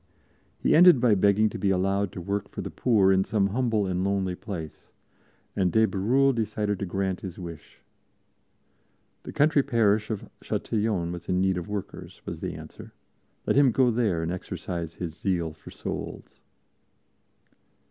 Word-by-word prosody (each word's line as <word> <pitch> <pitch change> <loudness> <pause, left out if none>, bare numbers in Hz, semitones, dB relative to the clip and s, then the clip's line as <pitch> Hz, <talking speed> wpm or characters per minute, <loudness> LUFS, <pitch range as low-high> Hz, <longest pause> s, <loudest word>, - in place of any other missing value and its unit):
He - - +2
ended 175 -4 +8
by 120 -3 +4
begging 100 +2 +4
to - - -7
be 100 - +1
allowed 95 +1 +1
to 90 - -6
work 100 +3 -3
for - - -6
the - - -6
poor 105 -6 +3
in 95 0 +3
some 100 -1 +1
humble 115 -2 0
and 90 -1 -1
lonely 95 -2 0
place, 90 -4 -7 0.7
and 95 -3 +1
de 110 +5 +4
Bérulle 125 +8 +2
decided 105 -3 -1
to 100 - -3
grant 95 0 -2
his 95 -3 -7
wish. 85 -4 -10 1.4
The - - -8
country 150 0 +3
parish 110 -5 +2
of 110 -3 -4
Châtillon 105 -6 -1
was 85 -1 -8
in 90 - +2
need 95 0 +2
of 85 - -8
workers, 105 -2 -6
was - - -6
the - - -4
answer; - - -11 0.5
let - - +1
him 140 -1 +6
go 125 +1 +3
there 105 -8 0
and 80 - -2
exercise 85 -2 -5
his 85 -3 -5
zeal 85 -2 -1
for 75 - -14
souls. - - -7
100 Hz, 165 wpm, -26 LUFS, 90-110 Hz, 1.4 s, ended